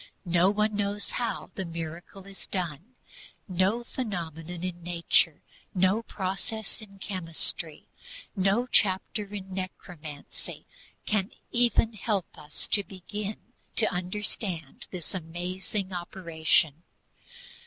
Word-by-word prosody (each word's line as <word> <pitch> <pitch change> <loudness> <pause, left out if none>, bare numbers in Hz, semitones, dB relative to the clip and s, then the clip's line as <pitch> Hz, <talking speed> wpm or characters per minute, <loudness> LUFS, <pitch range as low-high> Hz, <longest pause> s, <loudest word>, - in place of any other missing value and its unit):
No 175 +1 +5
one 210 +1 +3
knows 205 0 0
how 240 -2 -1
the 190 - -2
miracle 170 +3 -5
is 195 -1 -9
done. 180 - -3 0.5
No 190 +5 +3
phenomenon 175 - -3
in 175 -1 -2
nature, 170 -2 +3 0.3
no 190 +4 +5
process 210 +1 -2
in 200 -2 -11
chemistry, 165 -4 -1 0.5
no 195 +5 +4
chapter 205 -2 +3
in 195 -2 -5
necromancy 170 -5 -6 0.4
can 210 -2 +2 0.3
ever 240 -1 +6
help 205 -4 0
us 150 -1 -3
to 205 - +5
begin 205 +5 -5 0.2
to 220 - +7
understand 180 -3 -2
this 180 0 -2
amazing 185 +3 -2
operation. 165 -3 +2
185 Hz, 105 wpm, -30 LUFS, 170-205 Hz, 0.5 s, to